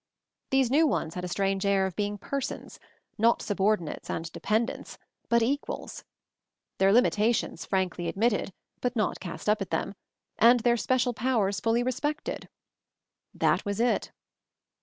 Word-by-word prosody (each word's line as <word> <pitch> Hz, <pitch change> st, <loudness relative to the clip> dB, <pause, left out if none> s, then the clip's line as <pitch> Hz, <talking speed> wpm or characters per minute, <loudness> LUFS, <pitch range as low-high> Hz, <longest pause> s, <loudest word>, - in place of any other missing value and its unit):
These 265 Hz, -2 st, +2 dB
new 310 Hz, +3 st, +5 dB
ones 165 Hz, -, -1 dB
had 180 Hz, -, -5 dB
a -, -, -2 dB
strange 195 Hz, +1 st, 0 dB
air 200 Hz, -1 st, +3 dB
of 190 Hz, -, -4 dB
being 205 Hz, 0 st, -2 dB
Persons, 275 Hz, +7 st, -5 dB, 0.4 s
not 230 Hz, +2 st, +4 dB
subordinates 200 Hz, -5 st, -1 dB
and 165 Hz, 0 st, -4 dB
dependents, 225 Hz, +7 st, -2 dB, 0.3 s
but 235 Hz, -1 st, +4 dB
Equals; 280 Hz, +5 st, -3 dB, 0.8 s
their 195 Hz, 0 st, +5 dB
limitations 230 Hz, -1 st, +2 dB
frankly 185 Hz, -2 st, -1 dB
ad -, -, -4 dB
mitted, 220 Hz, -2 st, +1 dB, 0.3 s
but 250 Hz, 0 st, -2 dB
not 215 Hz, -3 st, 0 dB
cast 180 Hz, +2 st, -7 dB
up 210 Hz, 0 st, +2 dB
at 195 Hz, -, -3 dB
them, 195 Hz, -, -2 dB, 0.5 s
and 240 Hz, +1 st, +6 dB
their 235 Hz, +1 st, +3 dB
special 250 Hz, +1 st, +1 dB
powers 220 Hz, -5 st, 0 dB
fully 230 Hz, +3 st, +1 dB
respected. 290 Hz, +5 st, -3 dB, 0.8 s
That -, -, +1 dB
was 205 Hz, 0 st, -3 dB
it! 240 Hz, +1 st, +1 dB
215 Hz, 145 wpm, -28 LUFS, 195-245 Hz, 0.8 s, and